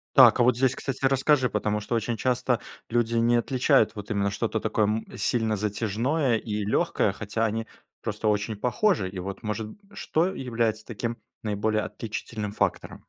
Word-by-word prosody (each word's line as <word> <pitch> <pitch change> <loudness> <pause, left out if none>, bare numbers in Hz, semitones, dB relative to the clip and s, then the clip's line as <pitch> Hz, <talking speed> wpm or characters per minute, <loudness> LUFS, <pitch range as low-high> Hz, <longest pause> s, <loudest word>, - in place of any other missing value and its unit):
Так, - - +8
а 120 - +6
вот 125 -1 +4
здесь, 130 +1 +2
кстати, 135 0 -4
расскажи, 135 -1 +3
потому 105 0 0
что 105 +3 -3
очень 115 +1 -1
часто 125 -1 +1 0.3
люди 115 0 +1
не 115 +1 +3
отличают 120 -3 +3
вот 105 0 -7
именно 100 -1 +1
что-то 110 +2 -1
такое, 110 0 +1
м, 110 +2 -1
сильно 110 +1 +1
затяжное 115 +6 0
и 105 -1 -3
легкое, 105 - +1
хотя 105 +2 -2
они 110 +1 -1 0.4
просто 110 - -2
очень 105 +1 +1
похожи. 120 - +1
И 95 - -9
вот, 95 +2 -5
может 105 0 -3 0.2
что 165 +3 0
является 115 - -1
таким 115 0 -4 0.2
наиболее 110 0 0
отличительным 110 -1 -5
фактором? - - -2
110 Hz, 165 wpm, -26 LUFS, 105-120 Hz, 0.4 s, Так